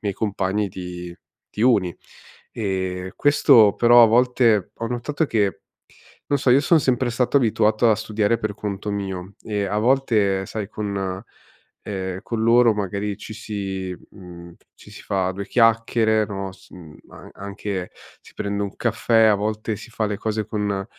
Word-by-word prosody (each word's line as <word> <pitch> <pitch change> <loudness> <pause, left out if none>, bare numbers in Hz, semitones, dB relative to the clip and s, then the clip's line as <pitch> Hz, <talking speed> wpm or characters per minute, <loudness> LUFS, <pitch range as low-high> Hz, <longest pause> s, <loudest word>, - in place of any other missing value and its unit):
miei 100 -2 -1
compagni 100 0 -1
di 90 -1 -8 0.4
di 105 - -4
uni. 100 -8 +2 0.5
E 95 -3 -3
questo, 130 -7 +5
però, 120 0 +6
a 115 - +8
volte, 115 -4 +2
ho 115 - -4
notato 125 +6 -2
che 105 -7 0 0.7
non 145 - +1
so, 130 - +1
io 130 +3 +6
son 160 +2 +3
sempre 130 -2 +1
stato 125 +3 0
abituato 110 -1 +2
a - - +5
studiare 110 0 0
per 110 -1 -3
conto 105 0 -5
mio 95 -1 -5
e 105 -2 -2
a 105 +2 -1
volte, 110 -6 +2
sai, 105 -1 -5
con, 100 -3 -4 0.6
ehm, 95 -2 -4
con 115 0 -3
loro 115 0 +5
magari 100 0 -3
ci 110 - -9
si 95 -4 -5
mhmm, 85 -3 -12 0.2
ci - - -17
si - - -11
fa 95 -1 -1
due 100 +1 -6
chiacchiere, 115 -2 +2
no, 100 -1 -5
s 95 - -19
uhm, 80 -5 -13 0.2
a - - -13
anche 100 -2 -5 0.3
si - - -19
prende 100 0 -3
un 100 - -5
caffè, 115 -1 +2
a 110 -1 +5
volte 110 +1 -3
si 115 +4 -11
fa 115 - -2
le 105 - -3
cose 110 0 -2
con 105 -3 -2
105 Hz, 165 wpm, -22 LUFS, 95-115 Hz, 0.7 s, a